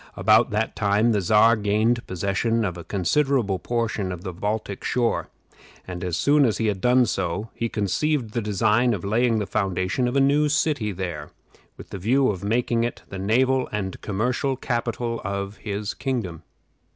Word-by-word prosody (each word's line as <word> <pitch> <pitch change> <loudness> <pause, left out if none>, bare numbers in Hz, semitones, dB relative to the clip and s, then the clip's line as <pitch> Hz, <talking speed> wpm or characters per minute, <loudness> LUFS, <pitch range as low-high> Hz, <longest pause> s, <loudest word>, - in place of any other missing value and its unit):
About 110 +3 +4
that 110 +1 -1
time 105 +3 +2
the 105 -3 +1
Czar 110 +5 +5
gained 110 +3 +1
possession 100 +5 0
of 90 -3 -3
a 85 - -8
considerable 105 - +1
portion 115 -5 -2
of 90 -1 -7
the 95 - -5
Baltic 105 +2 -3
shore; 120 -2 0 0.6
and 90 -1 -6
as 90 -2 -2
soon 145 +9 +4
as 115 -5 +2
he 115 - -1
had 100 -3 -1
done 125 +2 +4
so, 95 +1 -3
he 115 - -3
conceived 115 - -1
the 120 - -1
design 105 +3 +2
of 90 - -7
laying 115 +3 +2
the 105 - -1
foundation 95 +4 -1
of 125 - -2
a - - +4
new 145 +2 +3
city 145 -7 0
there, 85 -6 -5 0.5
with - - -12
the 100 - -5
view 130 +8 +2
of 95 -2 -7
making 115 +2 +1
it 120 - -4
the 95 - -6
naval 130 +6 +2
and 95 -3 -4
commercial 125 +6 -1
capital 120 -2 -2
of 100 +1 -4
his 105 0 -4
kingdom. 110 - -3
110 Hz, 175 wpm, -24 LUFS, 100-120 Hz, 0.6 s, Czar